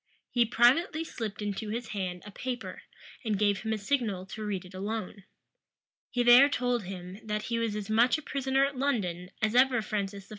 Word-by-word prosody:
He 240 Hz, -1 st, +3 dB
privately 265 Hz, -, +3 dB
slipped 215 Hz, -9 st, -5 dB
into 205 Hz, +1 st, -3 dB
his 230 Hz, +1 st, -4 dB
hand 185 Hz, -3 st, -4 dB
a 210 Hz, -, -9 dB
paper, 235 Hz, -4 st, -5 dB, 0.4 s
and 215 Hz, -3 st, 0 dB
gave 205 Hz, -1 st, +2 dB
him 220 Hz, -, -3 dB
a 220 Hz, -, 0 dB
signal 210 Hz, -5 st, -1 dB
to 215 Hz, +3 st, -7 dB
read 195 Hz, -3 st, -3 dB
it 180 Hz, -, -13 dB
alone. 200 Hz, 0 st, -5 dB, 0.8 s
He 245 Hz, -1 st, 0 dB
there 245 Hz, +4 st, +8 dB
told 245 Hz, -6 st, 0 dB
him, 185 Hz, +1 st, -7 dB
that 210 Hz, -1 st, -2 dB
he 230 Hz, 0 st, -1 dB
was 225 Hz, -2 st, -1 dB
as 210 Hz, -2 st, -4 dB
much 235 Hz, +5 st, +4 dB
a 310 Hz, -, -9 dB
prisoner 270 Hz, -1 st, +1 dB
at 280 Hz, 0 st, -4 dB
London 200 Hz, -10 st, -1 dB
as 215 Hz, 0 st, +2 dB
ever 250 Hz, 0 st, +5 dB
Francis 200 Hz, -2 st, -3 dB
I. -, -, -23 dB
220 Hz, 195 wpm, -29 LUFS, 200-245 Hz, 0.8 s, there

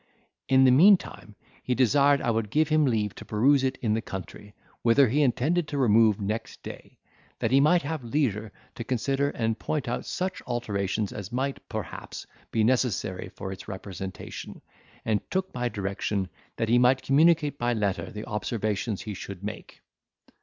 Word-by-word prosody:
In 130 Hz, 0 st, +6 dB
the 130 Hz, -, +6 dB
meantime, 160 Hz, -, +4 dB, 0.3 s
he 125 Hz, -, -1 dB
desired 140 Hz, +3 st, +4 dB
I 120 Hz, -, +2 dB
would 110 Hz, -2 st, -1 dB
give 155 Hz, +6 st, +2 dB
him 155 Hz, -1 st, +4 dB
leave 110 Hz, -5 st, 0 dB
to -, -, -10 dB
peruse 135 Hz, +6 st, +3 dB
it 130 Hz, 0 st, 0 dB
in 110 Hz, -2 st, +2 dB
the 110 Hz, -, 0 dB
country, 105 Hz, +1 st, -8 dB, 0.3 s
whither 125 Hz, +3 st, +5 dB
he 145 Hz, +6 st, +2 dB
intended 150 Hz, +5 st, +1 dB
to 145 Hz, -, -4 dB
remove 110 Hz, -4 st, +4 dB
next 105 Hz, +3 st, -4 dB
day, -, -, -10 dB, 0.4 s
that -, -, -1 dB
he 135 Hz, -, +6 dB
might 155 Hz, +5 st, +4 dB
have 150 Hz, -1 st, -4 dB
leisure 115 Hz, -5 st, -1 dB, 0.2 s
to 115 Hz, -, -6 dB
consider 135 Hz, +4 st, 0 dB
and 115 Hz, -4 st, -2 dB
point 150 Hz, -5 st, -2 dB
out 120 Hz, -, -3 dB
such 185 Hz, 0 st, -3 dB
alterations 105 Hz, -4 st, -2 dB
as 100 Hz, -2 st, -7 dB
might, 135 Hz, +3 st, -2 dB
perhaps, -, -, -6 dB, 0.2 s
be 110 Hz, -, +1 dB
necessary 110 Hz, -7 st, 0 dB
for 95 Hz, 0 st, -7 dB
its 95 Hz, -, -9 dB
representation; 95 Hz, -1 st, -7 dB, 0.4 s
and 110 Hz, -2 st, +1 dB
took 190 Hz, 0 st, -2 dB
my 125 Hz, -1 st, -1 dB
direction, 100 Hz, -2 st, -2 dB, 0.3 s
that 115 Hz, -, -1 dB
he 120 Hz, +1 st, +5 dB
might 130 Hz, +1 st, +4 dB
communicate 150 Hz, +1 st, +3 dB
by 120 Hz, 0 st, +1 dB
letter 100 Hz, -4 st, -1 dB
the 105 Hz, +1 st, -7 dB
observations 105 Hz, -1 st, -2 dB
he 105 Hz, -, -5 dB
should 100 Hz, 0 st, -8 dB
make. 105 Hz, -, -7 dB
120 Hz, 170 wpm, -27 LUFS, 105-140 Hz, 0.4 s, In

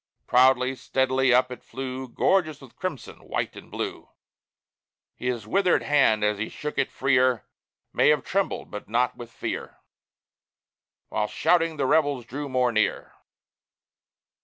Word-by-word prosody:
Proudly, 125 Hz, +1 st, +4 dB
steadily, 130 Hz, 0 st, +1 dB
up 125 Hz, +1 st, +4 dB
it 125 Hz, -, -8 dB
flew, 130 Hz, 0 st, -6 dB
Gorgeous 155 Hz, +3 st, +1 dB
with 135 Hz, -4 st, -15 dB
crimson, 185 Hz, -9 st, -5 dB
white -, -, -3 dB
and -, -, -12 dB
blue, -, -, -5 dB, 1.0 s
His 125 Hz, -4 st, -3 dB
withered 185 Hz, -, +2 dB
hand 135 Hz, -8 st, +3 dB
as 105 Hz, -1 st, +1 dB
he 110 Hz, -, -3 dB
shook 150 Hz, 0 st, -5 dB
it -, -, +1 dB
freer, 130 Hz, -3 st, +2 dB, 0.5 s
May -, -, +4 dB
have 150 Hz, 0 st, +3 dB
trembled, 195 Hz, +1 st, -2 dB
but 105 Hz, 0 st, -8 dB
not 125 Hz, +2 st, +1 dB
with 120 Hz, -1 st, -10 dB
fear, 115 Hz, -, -5 dB, 1.3 s
While 105 Hz, -1 st, -1 dB
shouting 165 Hz, +5 st, +1 dB
the 140 Hz, -, 0 dB
rebels 145 Hz, -3 st, +2 dB
drew 140 Hz, +4 st, -6 dB
more 125 Hz, -1 st, +2 dB
near. 110 Hz, -2 st, 0 dB
130 Hz, 135 wpm, -25 LUFS, 120-145 Hz, 1.3 s, Proudly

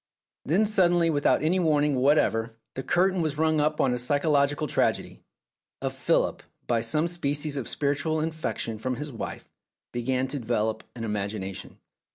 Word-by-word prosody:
Then 185 Hz, +9 st, +2 dB
suddenly 175 Hz, -5 st, +3 dB
without 145 Hz, 0 st, +2 dB
any 175 Hz, +4 st, +2 dB
warning 150 Hz, -3 st, +2 dB
whatever 125 Hz, -4 st, +2 dB, 0.2 s
the 130 Hz, -, -4 dB
curtain 185 Hz, +5 st, +2 dB
was 155 Hz, -3 st, -2 dB
rung 155 Hz, -1 st, +2 dB
up 150 Hz, +1 st, 0 dB
on 130 Hz, -, +3 dB
a 125 Hz, -, -1 dB
psychological 145 Hz, +3 st, +2 dB
tragedy; 145 Hz, -, -1 dB, 0.6 s
for -, -, -2 dB
Philip, -, -, 0 dB, 0.2 s
by 115 Hz, -2 st, +1 dB
some 150 Hz, +8 st, +1 dB
species 150 Hz, -3 st, -1 dB
of 135 Hz, -5 st, -3 dB
spiritual 145 Hz, +2 st, 0 dB
infection 155 Hz, -8 st, -3 dB
from 130 Hz, +3 st, -2 dB
his 150 Hz, +3 st, -6 dB
wife, 115 Hz, -, -6 dB, 0.4 s
began 130 Hz, +2 st, -1 dB
to 140 Hz, +1 st, -3 dB
develop 110 Hz, -2 st, -1 dB
an 115 Hz, -, -6 dB
imagination. 100 Hz, -2 st, -4 dB
145 Hz, 155 wpm, -26 LUFS, 120-155 Hz, 0.6 s, suddenly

